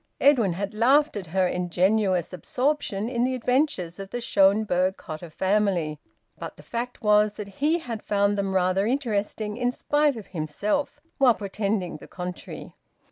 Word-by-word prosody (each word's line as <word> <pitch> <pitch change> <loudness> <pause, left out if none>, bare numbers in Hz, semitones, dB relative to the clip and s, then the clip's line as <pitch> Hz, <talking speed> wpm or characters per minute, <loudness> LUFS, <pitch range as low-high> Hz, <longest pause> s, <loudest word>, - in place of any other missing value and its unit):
Edwin 245 -10 +4
had 200 +3 -4
laughed 270 +7 +3
at 195 -4 -5
her 185 +3 +1
ingenuous 180 +1 +1
absorption 250 0 -1
in 240 -1 0
the 255 +1 +1
adventures 250 - 0
of 195 -1 -7
the 245 - -4
Schonberg 195 -3 +2
Cotta 160 +2 -8
family, 185 -4 0 0.4
but - - -7
the - - -14
fact 240 +1 -5
was 210 0 +4
that 200 -2 -9
he 310 +4 +3
had 235 -9 -6
found 200 0 +1
them 195 -1 -1
rather 185 +2 +2
interesting, 215 -4 -1
in 245 0 +1
spite 295 +2 +1
of 220 -3 -8
himself, 200 - -2 0.2
while 255 -4 +5
pretending 200 -2 -2
the - - -13
contrary. 180 -1 -7
205 Hz, 155 wpm, -25 LUFS, 185-245 Hz, 0.4 s, while